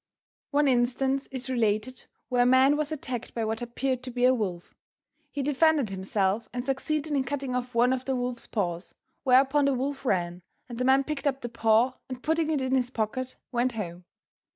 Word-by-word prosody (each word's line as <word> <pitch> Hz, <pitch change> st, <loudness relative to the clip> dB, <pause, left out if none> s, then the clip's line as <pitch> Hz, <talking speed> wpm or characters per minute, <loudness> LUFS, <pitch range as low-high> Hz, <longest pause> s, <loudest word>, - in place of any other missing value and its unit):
One 290 Hz, 0 st, +2 dB
instance 265 Hz, +2 st, +1 dB
is 260 Hz, -2 st, -6 dB
related 235 Hz, 0 st, -1 dB, 0.2 s
where 245 Hz, -1 st, +2 dB
a -, -, +5 dB
man 260 Hz, +3 st, +5 dB
was 300 Hz, 0 st, -1 dB
attacked 255 Hz, -6 st, -5 dB
by 230 Hz, -1 st, -1 dB
what 220 Hz, +1 st, -2 dB
appeared 250 Hz, +2 st, -2 dB
to 255 Hz, -, -6 dB
be 245 Hz, 0 st, +1 dB
a 255 Hz, -, +6 dB
wolf. 185 Hz, -8 st, -3 dB, 0.6 s
He 285 Hz, -1 st, -3 dB
defended 295 Hz, -4 st, +2 dB
himself 195 Hz, +3 st, -1 dB
and 245 Hz, 0 st, -4 dB
succeeded 295 Hz, +3 st, -1 dB
in 275 Hz, -2 st, +2 dB
cutting 270 Hz, -1 st, -3 dB
off 250 Hz, -1 st, -3 dB
one 245 Hz, +2 st, +4 dB
of 260 Hz, 0 st, -3 dB
the 265 Hz, -, 0 dB
wolf's 245 Hz, -1 st, -2 dB
paws, 175 Hz, -4 st, -3 dB, 0.3 s
whereupon 270 Hz, +2 st, +4 dB
the 275 Hz, -1 st, +2 dB
wolf 270 Hz, +2 st, -3 dB
ran 175 Hz, -7 st, -1 dB, 0.3 s
and 240 Hz, -2 st, -7 dB
the 250 Hz, -, 0 dB
man 265 Hz, +1 st, +5 dB
picked 300 Hz, +1 st, -3 dB
up 270 Hz, -1 st, -1 dB
the 240 Hz, -, -4 dB
paw 230 Hz, +2 st, +2 dB
and 255 Hz, -1 st, -7 dB
putting 320 Hz, 0 st, +1 dB
it 295 Hz, -4 st, 0 dB
in 260 Hz, 0 st, -1 dB
his 250 Hz, -2 st, +2 dB
pocket 255 Hz, +2 st, -3 dB, 0.2 s
went 245 Hz, 0 st, +1 dB
home. 180 Hz, -5 st, -6 dB
255 Hz, 200 wpm, -27 LUFS, 235-270 Hz, 0.6 s, a